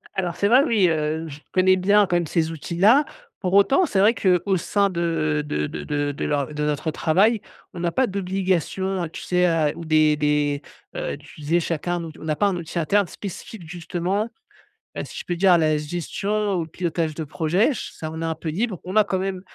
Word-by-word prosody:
Alors, 180 Hz, -3 st, -1 dB
c'est 200 Hz, -, +1 dB
vrai, 250 Hz, +6 st, +6 dB
oui, 210 Hz, -, +3 dB
heu, 155 Hz, +1 st, -1 dB
je 150 Hz, 0 st, -9 dB
connais 185 Hz, 0 st, +4 dB
bien 200 Hz, +2 st, +4 dB
quand 175 Hz, -, 0 dB
même 170 Hz, -2 st, +1 dB
ces 160 Hz, 0 st, 0 dB
outils-là. 190 Hz, -, +3 dB, 0.3 s
Pour 185 Hz, -1 st, -2 dB
autant, 270 Hz, -, +5 dB
c'est 205 Hz, -, 0 dB
vrai, 220 Hz, +4 st, +5 dB
qu'au 185 Hz, 0 st, +2 dB
sein 200 Hz, +3 st, +1 dB
de 160 Hz, -4 st, 0 dB
de 75 Hz, -, -2 dB
de 75 Hz, -1 st, -6 dB
de 145 Hz, -, -1 dB
de 140 Hz, -, -4 dB
leur 145 Hz, 0 st, -1 dB
de 150 Hz, -, -2 dB
notre 150 Hz, +1 st, -1 dB
travail, 195 Hz, +9 st, +2 dB, 0.3 s
on 175 Hz, -, -7 dB
n'a 170 Hz, 0 st, 0 dB
pas 260 Hz, +7 st, +2 dB
d'obligation, 190 Hz, -1 st, -1 dB
heu, 165 Hz, -, -4 dB
tu -, -, -9 dB
sais 180 Hz, 0 st, +1 dB
a 160 Hz, -4 st, +2 dB
ou 170 Hz, 0 st, -8 dB
des 155 Hz, -1 st, +3 dB
des, 150 Hz, -1 st, +1 dB, 0.3 s
heu, -, -, -3 dB
d'utiliser 150 Hz, +3 st, -2 dB
chacun 170 Hz, +1 st, -2 dB
un 170 Hz, -, -4 dB
out 160 Hz, -1 st, -9 dB
on -, -, -11 dB
n'a 155 Hz, -1 st, -1 dB
pas 205 Hz, -, +2 dB
un 195 Hz, -, 0 dB
outil 170 Hz, 0 st, -4 dB
interne 200 Hz, +4 st, +2 dB
spécifique 190 Hz, -2 st, -8 dB
justement, 180 Hz, +5 st, -2 dB, 0.7 s
heu, -, -, -1 dB
si -, -, -11 dB
je -, -, -6 dB
peux 175 Hz, -, -2 dB
dire 185 Hz, +1 st, +4 dB
à 170 Hz, -, +6 dB
la 155 Hz, -1 st, +2 dB
gestion 195 Hz, +6 st, -2 dB
ou 165 Hz, -, -1 dB
le -, -, -13 dB
pilotage 165 Hz, -2 st, -2 dB
de 160 Hz, -, -4 dB
projets. 165 Hz, -, +1 dB
Ch 265 Hz, -, -4 dB
ça 155 Hz, -, -6 dB
on 160 Hz, -, -6 dB
est 165 Hz, -, -3 dB
un 165 Hz, 0 st, -1 dB
peu 160 Hz, 0 st, -5 dB
libre. 195 Hz, +2 st, -2 dB
On 185 Hz, +4 st, -5 dB
a 215 Hz, -, +6 dB
quand 190 Hz, -2 st, -1 dB
même 190 Hz, -1 st, -3 dB
175 Hz, 230 wpm, -23 LUFS, 155-195 Hz, 0.7 s, vrai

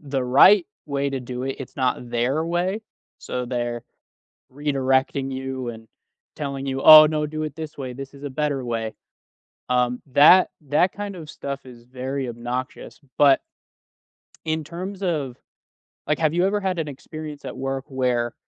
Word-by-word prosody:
the 135 Hz, -3 st, -2 dB
right 170 Hz, +9 st, +6 dB, 0.2 s
way 140 Hz, -1 st, -1 dB
to 135 Hz, -1 st, -3 dB
do 125 Hz, +1 st, -5 dB
it, 135 Hz, -, -3 dB
it's 130 Hz, -, -9 dB
not 125 Hz, -2 st, -1 dB
their 130 Hz, +7 st, 0 dB
way. 180 Hz, +5 st, -1 dB, 0.4 s
So, 125 Hz, -1 st, -4 dB
they're 120 Hz, -1 st, -3 dB, 0.7 s
redirecting 135 Hz, -1 st, 0 dB
you, 130 Hz, -1 st, -4 dB
and 115 Hz, -1 st, -10 dB, 0.5 s
telling 140 Hz, -2 st, -4 dB
you, 135 Hz, 0 st, -2 dB
"Oh, 155 Hz, 0 st, +11 dB
no, 150 Hz, 0 st, 0 dB
do 155 Hz, +1 st, -4 dB
it 155 Hz, -, -4 dB
this 155 Hz, -2 st, -7 dB
way. 130 Hz, -2 st, -5 dB
This 135 Hz, +2 st, -8 dB
is 140 Hz, +1 st, -13 dB
a 145 Hz, -, -4 dB
better 145 Hz, -1 st, -1 dB
way." 115 Hz, -2 st, -3 dB, 0.7 s
Um, 125 Hz, 0 st, +1 dB
that 150 Hz, +8 st, +7 dB, 0.2 s
that 180 Hz, +5 st, +3 dB
kind 205 Hz, -1 st, -5 dB
of 155 Hz, -3 st, -9 dB
stuff 140 Hz, -1 st, -6 dB
is 120 Hz, -2 st, -13 dB
very 130 Hz, +1 st, -4 dB
obnoxious. 120 Hz, +2 st, -5 dB, 0.2 s
But 140 Hz, -2 st, +5 dB, 1.0 s
in 160 Hz, 0 st, -1 dB
terms 185 Hz, +5 st, -7 dB
of 145 Hz, -9 st, -2 dB, 0.7 s
like, 150 Hz, -, +1 dB
have 155 Hz, -1 st, +2 dB
you 175 Hz, +2 st, +2 dB
ever 205 Hz, +1 st, +1 dB
had 190 Hz, -3 st, -2 dB
an 155 Hz, -, -2 dB
experience 150 Hz, +1 st, -8 dB
at -, -, -6 dB
work 135 Hz, 0 st, -3 dB
where 125 Hz, -3 st, 0 dB
135 Hz, 165 wpm, -23 LUFS, 125-155 Hz, 1.0 s, Oh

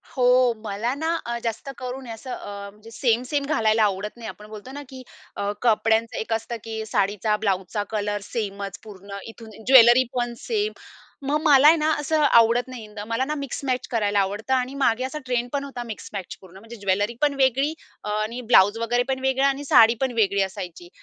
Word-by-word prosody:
हो, 250 Hz, -1 st, +4 dB
मला 215 Hz, +4 st, -2 dB
ना 320 Hz, +3 st, -1 dB
अ, 235 Hz, 0 st, -2 dB
जास्त 230 Hz, +3 st, -4 dB
करून 255 Hz, 0 st, -6 dB
असं 230 Hz, +3 st, -8 dB
अ, 200 Hz, -3 st, -7 dB
म्हणजे 215 Hz, +2 st, -16 dB
सेम, 235 Hz, 0 st, +1 dB
सेम 285 Hz, -1 st, 0 dB
घालायला 220 Hz, -6 st, +2 dB
आवडत 205 Hz, +2 st, -1 dB
नाही. 230 Hz, -1 st, -8 dB
आपण 210 Hz, -, -11 dB
बोलतो 215 Hz, +4 st, -10 dB
ना 285 Hz, +1 st, -7 dB
की 260 Hz, -1 st, -10 dB, 0.3 s
अ, 200 Hz, 0 st, -2 dB
कपड्यांचं 225 Hz, 0 st, +2 dB
एक 225 Hz, -, -2 dB
असतं, 225 Hz, +1 st, -3 dB
की 220 Hz, -1 st, -5 dB
साडीचा, 210 Hz, 0 st, 0 dB
ब्लाउजचा 200 Hz, 0 st, -1 dB
कलर 205 Hz, -1 st, -2 dB
सेमच 200 Hz, -4 st, -5 dB
पूर्ण 200 Hz, -2 st, -10 dB
इथून, 225 Hz, 0 st, -11 dB, 0.2 s
ज्वेलरी 255 Hz, -1 st, +8 dB
पण 240 Hz, -1 st, -1 dB
सेम. 430 Hz, -2 st, -1 dB, 0.6 s
मग 300 Hz, +2 st, +1 dB
मला 290 Hz, -3 st, +6 dB
आहे 320 Hz, -, +8 dB
ना, 310 Hz, 0 st, +1 dB
असं 310 Hz, +1 st, 0 dB
आवडत 235 Hz, -3 st, +4 dB
नाही 255 Hz, -3 st, -8 dB
इंद 210 Hz, 0 st, -11 dB
मला 230 Hz, +3 st, 0 dB
ना 300 Hz, +2 st, -2 dB
मिक्समॅच 270 Hz, -2 st, -3 dB
करायला 205 Hz, -3 st, +1 dB
आवडतं 205 Hz, +6 st, -1 dB
आणि 255 Hz, 0 st, 0 dB
मागे 255 Hz, -3 st, +1 dB
असा 265 Hz, +4 st, -4 dB
ट्रेंड 245 Hz, -1 st, -1 dB
पण 280 Hz, -1 st, -1 dB
होता 270 Hz, -3 st, -6 dB
मिक्समॅच 210 Hz, -4 st, -7 dB
पूर्ण. 190 Hz, -1 st, -15 dB
म्हणजे 225 Hz, +4 st, -11 dB
ज्वेलरी 205 Hz, +2 st, 0 dB
पण 295 Hz, -1 st, +3 dB
वेगळी 270 Hz, +4 st, +2 dB, 0.3 s
अ, -, -, -5 dB
आणि 215 Hz, +4 st, -2 dB
ब्लाउज 220 Hz, -3 st, +5 dB
वगैरे 240 Hz, +2 st, +1 dB
पण 265 Hz, 0 st, 0 dB
वेगळा 265 Hz, +1 st, +2 dB
आणि 275 Hz, +1 st, -1 dB
साडी 230 Hz, -3 st, +6 dB
पण 265 Hz, -1 st, +1 dB
वेगळी 200 Hz, -3 st, +2 dB
असायची. 180 Hz, -3 st, -7 dB
230 Hz, 195 wpm, -24 LUFS, 210-260 Hz, 0.6 s, ज्वेलरी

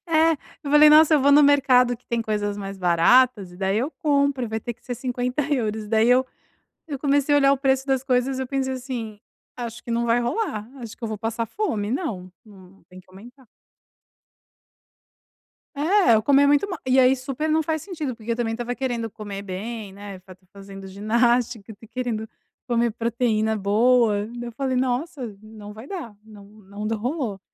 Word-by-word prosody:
É, 325 Hz, 0 st, +3 dB, 0.3 s
eu 280 Hz, -, -4 dB
falei: 300 Hz, +1 st, +7 dB
"Nossa, 310 Hz, +1 st, +7 dB
eu 290 Hz, -, +4 dB
vou 285 Hz, +1 st, +4 dB
no 295 Hz, +1 st, +7 dB
mercado 255 Hz, -4 st, +4 dB
que 245 Hz, -, -36 dB
tem 235 Hz, -1 st, -1 dB
coisas 205 Hz, -2 st, -2 dB
mais 195 Hz, -1 st, -7 dB
baratas 190 Hz, +3 st, +3 dB
e -, -, -13 dB
daí 195 Hz, +2 st, 0 dB
eu 270 Hz, +6 st, -1 dB
compro, 280 Hz, -6 st, 0 dB
e 230 Hz, -, -5 dB
vai 220 Hz, 0 st, -3 dB
ter 240 Hz, -, -5 dB
que -, -, -36 dB
ser 245 Hz, -, -4 dB
€50". 250 Hz, -2 st, -2 dB
E -, -, -11 dB
daí, 225 Hz, +1 st, +3 dB
eu 255 Hz, +1 st, +4 dB, 0.6 s
eu 280 Hz, -2 st, -4 dB
comecei 285 Hz, 0 st, +2 dB
a -, -, +6 dB
olhar 275 Hz, 0 st, +4 dB
o -, -, +2 dB
preço 265 Hz, 0 st, +1 dB
das 265 Hz, -1 st, 0 dB
coisas, 260 Hz, 0 st, 0 dB
eu 260 Hz, -, -3 dB
pensei 265 Hz, 0 st, -2 dB
assim: 245 Hz, -5 st, -6 dB, 0.4 s
"Acho 240 Hz, -1 st, -6 dB
que -, -, -8 dB
não 235 Hz, 0 st, 0 dB
vai 235 Hz, +1 st, +2 dB
rolar. 240 Hz, -, -2 dB
Acho 230 Hz, -3 st, -9 dB
que -, -, -8 dB
eu -, -, -3 dB
vou 215 Hz, -1 st, -5 dB
passar 225 Hz, +1 st, -3 dB
fome. 225 Hz, -, -3 dB
Não, 220 Hz, -, -4 dB
não 195 Hz, -3 st, -18 dB
tem 185 Hz, 0 st, -13 dB
que 185 Hz, -, -28 dB
aumentar". 245 Hz, +7 st, -15 dB, 2.3 s
É, 305 Hz, -, +3 dB
ou 215 Hz, -, +1 dB
comer 280 Hz, +4 st, +4 dB
muito 290 Hz, +7 st, +3 dB
mal. 365 Hz, -4 st, -5 dB
E 260 Hz, +1 st, +3 dB
aí, 255 Hz, +1 st, +6 dB
super 270 Hz, +4 st, -4 dB
não 315 Hz, +1 st, +2 dB
faz 315 Hz, -1 st, -2 dB
sentido, 310 Hz, -9 st, -5 dB
porque 230 Hz, +1 st, -4 dB
eu -, -, -2 dB
também 235 Hz, -2 st, -1 dB
estava 240 Hz, +1 st, -4 dB
querendo 245 Hz, -3 st, -3 dB
comer 205 Hz, -2 st, -7 dB
bem, 205 Hz, +2 st, -6 dB
né, 200 Hz, -1 st, -9 dB
fa 185 Hz, 0 st, -14 dB
tá 185 Hz, -, -32 dB
fazendo 195 Hz, -1 st, -11 dB
ginástica, 230 Hz, +2 st, 0 dB
tá 215 Hz, +3 st, -16 dB
querendo 225 Hz, -2 st, -4 dB, 0.4 s
comer 235 Hz, -1 st, +1 dB
proteína 225 Hz, -1 st, 0 dB
boa. 215 Hz, +1 st, +2 dB
Daí, 240 Hz, +1 st, -7 dB
eu -, -, -10 dB
falei: 260 Hz, +1 st, -2 dB
"Nossa, 250 Hz, -2 st, -2 dB
não 215 Hz, -1 st, -11 dB
vai 220 Hz, +4 st, -11 dB
dar. 295 Hz, -, -7 dB
Não 210 Hz, -2 st, -14 dB
não 205 Hz, 0 st, -9 dB
d 225 Hz, -, -1 dB
rolou". 230 Hz, -, -3 dB
240 Hz, 200 wpm, -23 LUFS, 215-270 Hz, 2.3 s, falei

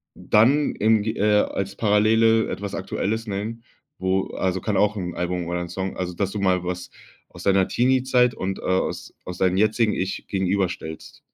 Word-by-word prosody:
dann 135 Hz, +8 st, +3 dB
im 110 Hz, 0 st, +3 dB
ge 110 Hz, +1 st, -2 dB
äh, 105 Hz, 0 st, +4 dB
als 100 Hz, 0 st, -3 dB
Parallele 110 Hz, +1 st, +3 dB
etwas 100 Hz, 0 st, -4 dB
Aktuelles 110 Hz, +3 st, -3 dB
nennen, 110 Hz, +3 st, -4 dB, 0.3 s
wo 95 Hz, +1 st, 0 dB
also, 95 Hz, -1 st, -1 dB
kann 105 Hz, 0 st, -1 dB
auch 105 Hz, +1 st, +2 dB
'n 90 Hz, -4 st, -4 dB
Album 90 Hz, -1 st, -2 dB
oder 90 Hz, 0 st, -2 dB
'n 90 Hz, -, -5 dB
Song 95 Hz, +1 st, -4 dB
also, 90 Hz, -1 st, -3 dB
dass 95 Hz, +2 st, -2 dB
du 105 Hz, -, -4 dB
mal 95 Hz, -2 st, +1 dB
was 90 Hz, 0 st, -5 dB, 0.4 s
aus 85 Hz, -, -12 dB
deiner 95 Hz, -1 st, +3 dB
Teenie-Zeit 125 Hz, 0 st, +2 dB
und, 95 Hz, +1 st, -3 dB
äh, -, -, -10 dB
aus 95 Hz, 0 st, -2 dB
aus 90 Hz, -, -6 dB
deinem 95 Hz, 0 st, +2 dB
jetzigen 110 Hz, +1 st, +2 dB
Ich 95 Hz, +1 st, -3 dB
gegenüberstellst. 95 Hz, -4 st, -2 dB
100 Hz, 180 wpm, -23 LUFS, 95-110 Hz, 0.4 s, äh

